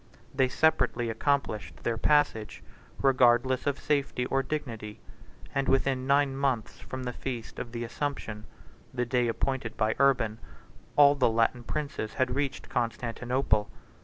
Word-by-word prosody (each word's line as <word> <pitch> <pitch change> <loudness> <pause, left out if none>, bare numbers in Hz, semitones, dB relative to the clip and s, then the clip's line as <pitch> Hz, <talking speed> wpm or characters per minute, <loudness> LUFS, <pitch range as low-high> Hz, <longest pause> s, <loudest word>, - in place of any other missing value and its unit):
They 130 -1 +2
separately 125 -6 +2
accomplished 125 -2 -1
their 120 - 0
passage, 115 -4 +1 0.4
regardless 130 0 +4
of 140 -1 +1
safety 140 -4 0
or 135 +1 +1
dignity; 115 -7 -5 0.5
and 135 0 0
within 135 -1 +1
nine 140 -1 +3
months 135 -5 -1
from 130 0 -7
the 125 -1 -3
feast 120 -4 -6
of 120 - -6
the 120 0 -4
Assumption, 115 -3 -4 0.5
the 125 -1 -1
day 125 0 +1
appointed 120 0 -2
by 110 0 +2
Urban, 125 -5 +3 0.6
all 145 -1 +7
the 140 -4 +2
Latin 115 +2 +1
princes 140 -4 -4
had 130 -2 +1
reached 140 0 -2
Constantinople. 120 -1 -1
125 Hz, 135 wpm, -28 LUFS, 115-140 Hz, 0.6 s, all